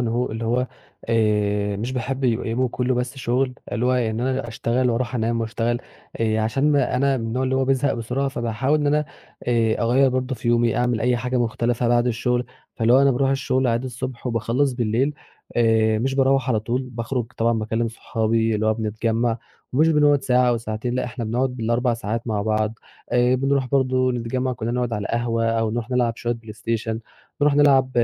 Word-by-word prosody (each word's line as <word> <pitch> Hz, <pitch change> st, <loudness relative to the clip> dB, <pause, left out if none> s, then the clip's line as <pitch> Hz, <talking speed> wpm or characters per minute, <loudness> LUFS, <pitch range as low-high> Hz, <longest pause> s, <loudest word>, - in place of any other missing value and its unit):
إن 120 Hz, -, 0 dB
هو 120 Hz, +2 st, -1 dB
اللي 110 Hz, +1 st, -4 dB
هو 125 Hz, +3 st, +1 dB, 0.4 s
آآ، 105 Hz, -2 st, +1 dB
مش 115 Hz, +6 st, -3 dB
باحب 130 Hz, +2 st, -3 dB
يبقى 120 Hz, -2 st, +1 dB
يومُه 125 Hz, +3 st, 0 dB
كلّه 125 Hz, +1 st, -1 dB
بس 125 Hz, +2 st, -2 dB
شغل 130 Hz, +1 st, 0 dB, 0.2 s
اللي 120 Hz, +2 st, 0 dB
هو 130 Hz, -, +3 dB
إن 115 Hz, -3 st, 0 dB
أنا 130 Hz, -1 st, -1 dB
أشتغل 120 Hz, +2 st, 0 dB
وأرُوح 120 Hz, +1 st, -1 dB
أنام 115 Hz, 0 st, 0 dB
وأشتغل 115 Hz, +1 st, -1 dB, 0.4 s
آآ، 110 Hz, -1 st, +1 dB
عشان 135 Hz, +7 st, +2 dB
أنا 140 Hz, 0 st, +2 dB
من 115 Hz, -3 st, -3 dB
النوع 120 Hz, +3 st, -1 dB
اللي 130 Hz, 0 st, 0 dB
هو 135 Hz, -, +2 dB
بيزهق 135 Hz, +1 st, +2 dB
بسرعة 125 Hz, +4 st, -2 dB
فباحاول 125 Hz, +4 st, 0 dB
إن 145 Hz, -, 0 dB
أنا 150 Hz, +1 st, +2 dB, 0.4 s
آآ، 115 Hz, -2 st, +2 dB
أغيّر 130 Hz, +4 st, +4 dB
برضه 130 Hz, +1 st, -1 dB
في 120 Hz, -, -4 dB
يومي، 120 Hz, -1 st, +2 dB
أعمل 120 Hz, -2 st, +1 dB
أي 125 Hz, 0 st, +2 dB
حاجة 125 Hz, +1 st, -2 dB
مختلفة 120 Hz, 0 st, 0 dB
بعد 120 Hz, 0 st, +3 dB
الشغل، 125 Hz, +1 st, 0 dB, 0.3 s
فاللي 115 Hz, +1 st, +3 dB
هو 135 Hz, +2 st, +6 dB
أنا 140 Hz, -, +5 dB
بارُوح 135 Hz, +1 st, +1 dB
الشغل 130 Hz, -1 st, +1 dB
عادي 120 Hz, +2 st, 0 dB
الصبح، 130 Hz, 0 st, -6 dB
وباخلّص 120 Hz, +4 st, 0 dB
بالليل 120 Hz, +4 st, 0 dB, 0.4 s
آآ، 110 Hz, -2 st, +3 dB
مش 135 Hz, +4 st, -1 dB
باروّح 135 Hz, 0 st, +2 dB
على 110 Hz, -4 st, +2 dB
طول، 120 Hz, +4 st, -1 dB
باخرُج 125 Hz, -1 st, -3 dB
طبعًا 115 Hz, +1 st, +2 dB
باكلّم 110 Hz, +2 st, -1 dB
صحابي 115 Hz, 0 st, 0 dB
اللي 110 Hz, +1 st, 0 dB
هو 110 Hz, -, +3 dB
بنتجمّع 115 Hz, +2 st, -1 dB, 0.3 s
ومش 155 Hz, +5 st, +4 dB
بنقعد 145 Hz, -3 st, +4 dB
ساعة 125 Hz, -1 st, +3 dB
أو 120 Hz, -, +2 dB
ساعتين 115 Hz, +2 st, -4 dB
لأ، 130 Hz, -, 0 dB
إحنا 120 Hz, -1 st, -5 dB
بنقعد 125 Hz, +4 st, 0 dB
بال4 120 Hz, +1 st, +1 dB
ساعات 115 Hz, +1 st, -4 dB
مع 105 Hz, -3 st, -1 dB
بعض 110 Hz, 0 st, 0 dB, 0.4 s
آآ، 125 Hz, +1 st, +4 dB
بنرُوح 135 Hz, 0 st, +1 dB
برضه 130 Hz, -2 st, +2 dB
نتجمّع 125 Hz, +2 st, -2 dB
كلّنا 115 Hz, -1 st, -3 dB
نقعد 125 Hz, -1 st, -1 dB
على 105 Hz, -2 st, -2 dB
القهوة 115 Hz, -1 st, 0 dB
أو 115 Hz, -1 st, +1 dB
نرُوح 120 Hz, +2 st, -4 dB
نلعب 120 Hz, -2 st, +1 dB
شوية 120 Hz, 0 st, -2 dB
play 115 Hz, -2 st, -10 dB
station 110 Hz, +1 st, -3 dB, 0.4 s
نرُوح 145 Hz, -1 st, +4 dB
نلعب 135 Hz, -3 st, +4 dB
120 Hz, 195 wpm, -22 LUFS, 115-130 Hz, 0.4 s, هو